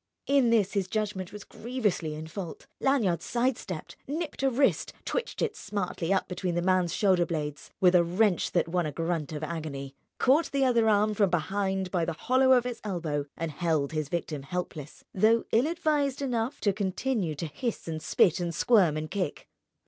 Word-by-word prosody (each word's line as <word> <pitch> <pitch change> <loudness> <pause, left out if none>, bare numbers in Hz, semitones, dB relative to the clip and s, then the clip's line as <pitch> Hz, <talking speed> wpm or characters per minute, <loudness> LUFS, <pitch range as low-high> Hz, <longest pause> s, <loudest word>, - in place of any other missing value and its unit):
In 275 -3 +4
this 215 -4 +3
his 195 -3 0
judgment 200 -3 -2
was 210 -1 -8
grievously 210 -10 -2
in 155 +1 -6
fault. 165 0 -7
Lanyard 225 -11 +2
sidestepped, 235 -8 -2
nipped 305 +1 -4
a 270 - +3
wrist, 270 +2 +1
twitched - - -2
it 445 -2 -1
smartly 190 - -3
up 195 - +2
between 180 -1 -2
the 175 - +1
man's 185 -2 +2
shoulder 190 -3 +3
blades 150 -4 -4
(with 180 -1 +5
a 175 -1 +6
wrench 180 +1 +1
that 175 - +2
won 175 -1 0
a - - -3
grunt 165 -1 -2
of 155 0 -5
agony), 150 -4 -5 0.2
caught 280 +6 +3
the 275 -1 +2
other 235 -3 +3
arm 210 0 +3
from 200 -2 +3
behind 190 +2 -1
by 175 -2 +1
the 170 - -1
hollow 260 +9 +3
of 245 -1 +4
its 245 -2 -4
elbow, 160 -8 -2
and 165 -1 -3
held 155 -3 0
his 155 -2 -2
victim 160 -4 -3
helpless—though 180 +7 -1
ill 240 +6 +3
advised 295 -5 0
enough 245 -1 -1
to 200 -2 +2
continue 200 -2 -1
to 155 - -4
hiss 215 - -4
and 160 -1 -4
spit 165 +2 +3
and 170 -2 -2
squirm 185 -10 +4
and 155 0 -5
kick. 185 -7 -3
185 Hz, 185 wpm, -28 LUFS, 165-235 Hz, 0.2 s, a